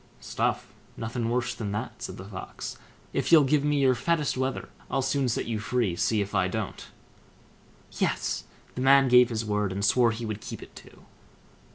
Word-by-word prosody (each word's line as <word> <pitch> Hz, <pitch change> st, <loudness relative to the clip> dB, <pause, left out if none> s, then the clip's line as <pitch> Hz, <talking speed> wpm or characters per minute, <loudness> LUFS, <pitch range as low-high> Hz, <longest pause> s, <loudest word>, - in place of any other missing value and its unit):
"Stuff, -, -, -2 dB, 0.2 s
nothing 115 Hz, +1 st, -3 dB
worse 120 Hz, 0 st, 0 dB
than 105 Hz, -3 st, -4 dB
that", 105 Hz, -, -5 dB
said -, -, -6 dB
the 95 Hz, -, -8 dB
Fox; 95 Hz, -1 st, -7 dB, 0.4 s
"if -, -, -1 dB
you'll 160 Hz, -3 st, +8 dB
give 140 Hz, +1 st, +2 dB
me 145 Hz, -1 st, +2 dB
your 130 Hz, -1 st, +5 dB
fattest 155 Hz, +3 st, 0 dB
wether, 130 Hz, +1 st, -2 dB, 0.2 s
I'll 135 Hz, -, 0 dB
soon 135 Hz, -1 st, +1 dB
set 115 Hz, -, -1 dB
you 110 Hz, -2 st, -2 dB
free; 115 Hz, -5 st, 0 dB
see 105 Hz, +4 st, +1 dB
if 100 Hz, +1 st, -4 dB
I 95 Hz, -2 st, +2 dB
don't." 105 Hz, +1 st, -4 dB, 1.1 s
Yes! -, -, -1 dB, 0.3 s
the 125 Hz, -, -4 dB
man 135 Hz, 0 st, +6 dB
gave 125 Hz, 0 st, +7 dB
his 115 Hz, -1 st, -2 dB
word, 105 Hz, -2 st, 0 dB
and 100 Hz, +2 st, -1 dB
swore 120 Hz, +2 st, +4 dB
he 115 Hz, +1 st, -4 dB
would 110 Hz, -1 st, -4 dB
keep -, -, -7 dB
it -, -, -15 dB
too. -, -, -15 dB
120 Hz, 190 wpm, -27 LUFS, 105-130 Hz, 1.1 s, you'll